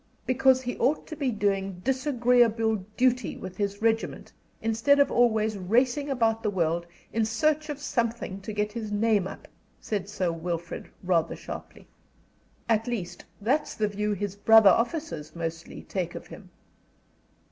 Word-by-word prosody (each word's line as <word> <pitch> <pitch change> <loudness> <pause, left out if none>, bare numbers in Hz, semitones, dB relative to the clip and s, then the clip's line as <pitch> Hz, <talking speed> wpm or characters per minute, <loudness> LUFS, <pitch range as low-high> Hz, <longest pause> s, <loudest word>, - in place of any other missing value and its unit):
"Because 260 0 +3
he 245 0 -3
ought 275 +5 +1
to 310 - -7
be 285 -3 -1
doing 195 -4 -1
disagreeable 245 -4 +2 0.2
duty 255 0 +2
with 185 -1 -8
his 200 0 -3
regiment 225 0 0 0.3
instead 225 +6 +3
of 280 - +4
always 220 -3 +2
racing 245 +9 +1
about 225 -4 +1
the 215 - 0
world 170 -3 0 0.3
in 225 - +2
search 305 +8 +1
of 295 - -3
something 235 -7 -2
to 205 - -6
get 210 0 -1
his 220 -2 -5
name 205 -2 +2
up," - - -10 0.3
said 200 -2 -3
Sir 185 -4 -1
Wilfrid, 170 0 -5
rather 170 -3 +1
sharply. - - -9 0.8
"At 225 0 +1
least, 215 -8 -4
that's 260 +9 0
the 215 - +1
view 210 +1 -1
his 200 0 -3
brother 220 0 +7
officers 230 - -2
mostly 165 0 -5
take 180 -3 -3
of - - -7
him." - - -12
220 Hz, 150 wpm, -27 LUFS, 195-245 Hz, 0.8 s, brother